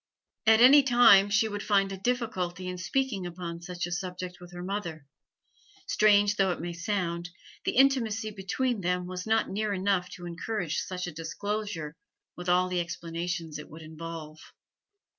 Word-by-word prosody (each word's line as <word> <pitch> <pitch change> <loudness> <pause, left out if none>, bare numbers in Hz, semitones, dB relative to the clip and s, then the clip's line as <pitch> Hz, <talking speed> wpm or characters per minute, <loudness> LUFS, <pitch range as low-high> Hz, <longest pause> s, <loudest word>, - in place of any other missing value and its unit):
At 220 +1 +7
any 275 +4 +9
time 240 -6 +6
she 200 +2 +3
would 205 -1 -4
find 195 -2 +2
a - - -3
difficulty 190 -5 -2
in 180 0 -5
speaking 200 -1 -1
upon 170 -1 -6
such 175 -1 -4
a 175 - -7
subject 180 0 -5
with 175 0 -12
her 175 0 -7
mother; 180 -6 -4 0.8
strange 205 - +4
though 195 -1 +3
it - - -4
may 175 0 -4
sound, 170 -1 -2 0.4
the - - 0
intimacy 230 -5 +3
between 210 +4 -2
them 180 0 0
was 180 +2 -6
not 220 0 +2
near 210 +1 -1
enough 190 -1 0
to 180 -1 -9
encourage 175 0 -3
such 180 -1 -4
a 175 - -5
disclosure, 165 0 -4 0.4
with 180 0 -5
all 180 +1 +4
the 180 -1 -1
explanations 170 -1 -4
it 150 - -10
would 160 +1 -11
involve. 160 -1 -8
185 Hz, 165 wpm, -28 LUFS, 175-210 Hz, 0.8 s, any